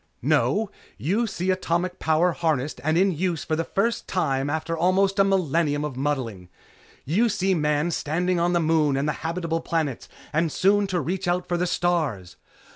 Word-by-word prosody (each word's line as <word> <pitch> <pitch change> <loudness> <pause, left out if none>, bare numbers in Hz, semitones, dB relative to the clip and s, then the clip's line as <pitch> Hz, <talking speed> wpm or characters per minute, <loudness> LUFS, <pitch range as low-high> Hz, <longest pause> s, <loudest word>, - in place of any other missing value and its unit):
"No! 210 0 +2 0.3
You 210 - 0
see 185 -2 -1
atomic 180 0 -1
power 160 +3 +2
harnessed 155 -4 -1
and 155 +2 +1
in 190 +2 +4
use 170 -1 -1
for 155 - -1
the 165 - -1
first 205 +7 -1
time 135 -6 0
after 160 +2 -2
almost 190 +4 +2
a - - +7
millenium 165 -6 +1
of 145 -4 -5
muddling. 125 -10 -3 0.6
You 210 - +2
see 190 -2 +1
Man 150 0 +1
standing 175 +4 0
on 175 +1 +1
the 175 - +3
Moon 155 -4 +2
and 140 +2 0
the 150 - +1
habitable 165 0 -2
planets 155 -7 -2 0.2
and 160 +1 +1
soon 200 +4 +3
to 185 -2 -1
reach 180 +5 -3
out 175 +1 0
for 175 - 0
the 180 +1 0
stars! 155 - -1
170 Hz, 180 wpm, -24 LUFS, 150-185 Hz, 0.6 s, a